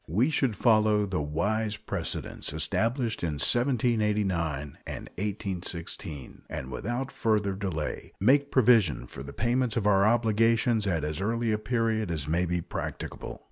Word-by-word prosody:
We 110 - +2
should 135 -6 +1
follow 110 -2 +4
the 95 -5 -2
wise 105 +9 -1
precedents - - -4
established 115 - 0
in 85 -3 -1
1789 105 - +1
and - - -6
1816, 90 - -5
and 65 - -5
without 120 +4 -3
further 105 -3 +1
delay 95 -6 -4
make 140 +7 +4
provision 110 - +4
for - - -9
the 70 +1 -7
payment 120 - 0
of 110 - 0
our 100 -2 +5
obligations 115 0 +3
at 85 -5 0
as 75 +3 -3
early 115 +2 0
a 105 - 0
period 110 -2 0
as 75 -3 -3
may 85 +3 +1
be 90 0 0
practicable. - - -6
105 Hz, 140 wpm, -28 LUFS, 85-115 Hz, -, our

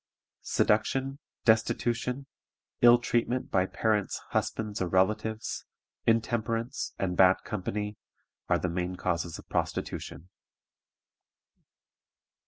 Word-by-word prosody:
Seduction; 135 +6 +1 0.3
destitution; 120 +3 +1 0.6
ill 120 0 +9
treatment 120 +1 -1
by 95 -1 +3
parents, 105 -2 0
husbands, 105 -2 -2
or 90 - +1
relatives; 105 +4 0 0.4
intemperance; 115 +1 0
and 90 -2 -1
bad 95 +1 +5
company, 105 +1 -3 0.5
are - - +4
the - - -1
main 90 +1 -2
causes 85 -2 -2
of - - -13
prostitution. 90 - -3
110 Hz, 90 wpm, -29 LUFS, 95-120 Hz, 0.6 s, ill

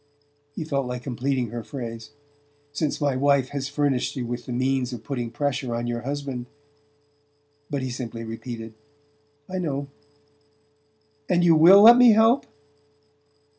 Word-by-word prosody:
He - - -4
felt 140 -4 -2
like 125 0 -5
completing 130 -1 -2
her 120 -1 -5
phrase: 115 -1 -7 0.6
"Since 145 0 -2
my 145 -3 0
wife 140 -1 +2
has 140 -1 -4
furnished 145 -3 -1
you 125 -3 -3
with 120 0 -6
the - - -5
means 130 0 -1
of 115 -2 -8
putting 120 -1 -4
pressure 130 -1 -2
on 120 0 -3
your 120 0 -3
husband 135 -2 -5 0.6
" 145 0 -42
but 140 -3 -3
he 130 - -3
simply 120 -2 -6
repeated: 115 0 -7 0.7
"I 185 0 -4
know." 140 -5 -3 1.4
"And 175 -1 +2
you 170 -1 +5
WILL 185 +6 +8
let 235 +2 +9
me 245 -2 +7
help?" 225 +5 +3
135 Hz, 150 wpm, -24 LUFS, 120-145 Hz, 1.4 s, let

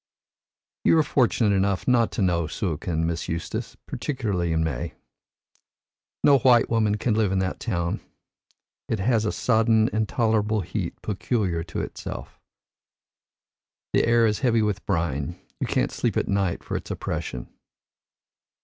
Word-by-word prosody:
You - - +5
are 160 - +5
fortunate 115 -7 +2
enough 95 0 0
not 120 -3 +3
to 105 - 0
know 85 -3 +1
Suakin, 80 -1 -2
Miss 85 -1 -2
Eustace, 85 0 -4
particularly 100 - -2
in 80 0 +1
May. 70 -7 -3 1.3
No 140 -1 +6
white 120 -2 +4
woman 110 -2 +2
can 115 +1 0
live 105 -3 +2
in 95 - +1
that 95 0 -1
town. 85 -7 -1 0.9
It 115 - +1
has 110 +2 +1
a 105 - +1
sodden 110 -1 +3
intolerable 110 -1 +1
heat 90 0 -4
peculiar 100 -5 -1
to 85 - -4
itself. - - -7 1.5
The - - +3
air 115 0 +5
is 105 -2 +1
heavy 115 -4 +2
with 105 -2 -1
brine; 85 -2 -1 0.2
you - - -1
can't - - +1
sleep - - -1
at - - 0
night 100 -3 0
for - - -4
its - - -5
oppression. 60 -1 -4
105 Hz, 140 wpm, -25 LUFS, 85-115 Hz, 1.5 s, No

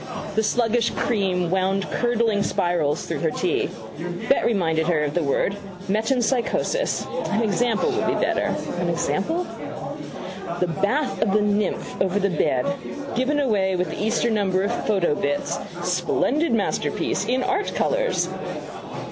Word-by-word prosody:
The 220 - +2
sluggish 230 +1 +2
cream 185 -6 0
wound 190 +1 +1
curdling 235 -3 +2
spirals 175 -7 +1
through 160 -4 -3
her 160 - +1
tea. 180 +3 0 0.6
Better - - +4
remind 170 -8 +1
her 160 -1 +2
of 145 -1 -1
the 175 - +1
word: 155 +7 +1 0.3
metempsychosis. 245 - +1 0.2
An 220 +2 +1
example 225 +1 +2
would - - 0
be - - +2
better. - - +1 0.2
An - - 0
example? 345 +2 0 1.1
The 180 - +3
Bath 255 - 0
of 200 -3 +2
the 210 - +4
Nymph 205 -1 0
over 190 +1 +2
the 200 -1 +2
bed. 130 -7 +1 0.5
Given 265 +4 +1
away 200 -8 +2
with 180 0 -1
the - - -3
Easter 230 +2 +2
number 195 -3 +2
of 200 - 0
Photo 190 -7 +3
Bits: 145 -1 -1 0.2
Splendid 260 - +1
masterpiece 195 -5 0
in 255 +2 +1
art 395 +2 0
colours. - - +1
205 Hz, 140 wpm, -23 LUFS, 180-240 Hz, 1.1 s, Better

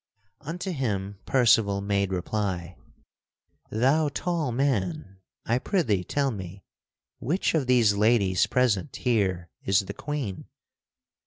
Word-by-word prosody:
Unto 175 +6 -5
him 100 - -3
Percival 115 -6 +4
made 100 -1 0
reply: 90 -2 -2 0.9
"Thou 140 +7 +2
tall 165 -1 -2
man, 130 - -1 0.3
I 120 +2 +1
prithee 125 - 0
tell 140 +8 0
me, 95 -2 -8 0.6
which 160 - 0
of 150 -6 0
these 120 -5 +4
ladies 100 -3 +3
present 125 -1 +1
here 95 -8 0
is 95 +1 +3
the 95 - -7
Queen?" 140 -11 -4
110 Hz, 110 wpm, -26 LUFS, 95-140 Hz, 0.9 s, Percival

